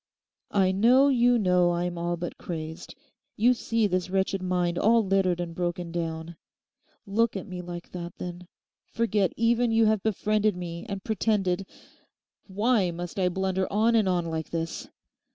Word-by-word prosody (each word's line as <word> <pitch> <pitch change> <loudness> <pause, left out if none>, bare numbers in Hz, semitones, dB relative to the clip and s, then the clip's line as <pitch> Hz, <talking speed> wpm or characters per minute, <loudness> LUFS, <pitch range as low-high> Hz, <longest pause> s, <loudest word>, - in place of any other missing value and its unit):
'I 190 -2 +2
know 245 +8 +5
you 245 -2 +4
know 180 -4 +3
I'm 175 0 -2
all 175 0 -2
but 175 +1 -6
crazed; 160 0 -6 0.4
you 240 +4 +4
see 230 -2 0
this 185 -2 -1
wretched 190 0 0
mind 180 -1 0
all 225 0 +4
littered 190 -2 +1
and 175 -1 -4
broken 175 0 -3
down; 165 -1 -4 0.7
look 215 +1 +1
at 190 - -6
me 185 -3 -6
like 175 -1 -8
that, 175 -1 -7
then. 175 0 -7 0.4
Forget 215 -5 0
even 235 +1 +2
you 225 0 +4
have 215 -2 +2
befriended 215 -1 +1
me 170 -1 -6
and 200 -2 -5
pretended—Why 205 +1 -2
must 175 +2 -6
I 180 -1 +2
blunder 190 +1 -1
on 220 +3 +3
and 215 -4 +3
on 175 -2 0
like 160 -1 -4
this? 165 0 -4
185 Hz, 155 wpm, -27 LUFS, 175-215 Hz, 0.7 s, know